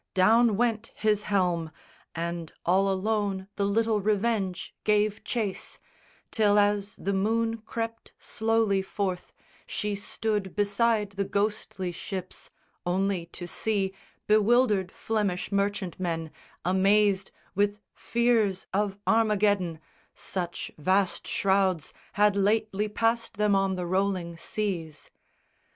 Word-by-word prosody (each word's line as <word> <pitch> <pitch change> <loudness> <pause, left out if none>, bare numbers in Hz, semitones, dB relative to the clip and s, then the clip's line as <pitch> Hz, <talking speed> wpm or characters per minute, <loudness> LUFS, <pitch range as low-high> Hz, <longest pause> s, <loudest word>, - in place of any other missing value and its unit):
Down 220 +3 +5
went 230 -1 0
his 210 -1 +1
helm, 175 -5 +1 0.5
And 170 -1 -3
all 190 +3 +3
alone 195 -1 -1
the 200 - 0
little 220 +1 +2
Revenge 205 -3 0
gave 210 0 +2
chase, 215 -6 -3 0.5
Till 210 -2 +3
as 205 -1 +2
the 200 - -2
moon 225 +3 +1
crept 225 +1 -5
slowly 220 -3 +1
forth, 190 -2 -3 0.4
she 210 -1 -2
stood 205 -1 -2
Beside 210 +1 +1
the 200 0 -1
ghostly 200 -2 -2
ships, 185 +1 -6 0.3
only 185 -1 0
to 175 +1 -7
see 195 +2 -1 0.3
Bewildered 215 -2 +3
Flemish 210 -5 -2
merchantmen, 185 -5 -1 0.3
amazed 195 +1 +3 0.2
With 205 +1 +1
fears 230 -5 +1
of 200 0 0
Armageddon 205 -6 +2 0.4
such 175 -2 -4
vast 185 +4 +1
shrouds 190 -5 +1 0.2
Had 210 -2 +4
lately 210 +1 +1
passed 225 +2 0
them 210 -1 +2
on 195 -1 +2
the 180 -1 -3
rolling 185 -2 0
seas. 170 -4 -4
200 Hz, 110 wpm, -27 LUFS, 190-215 Hz, 0.5 s, Down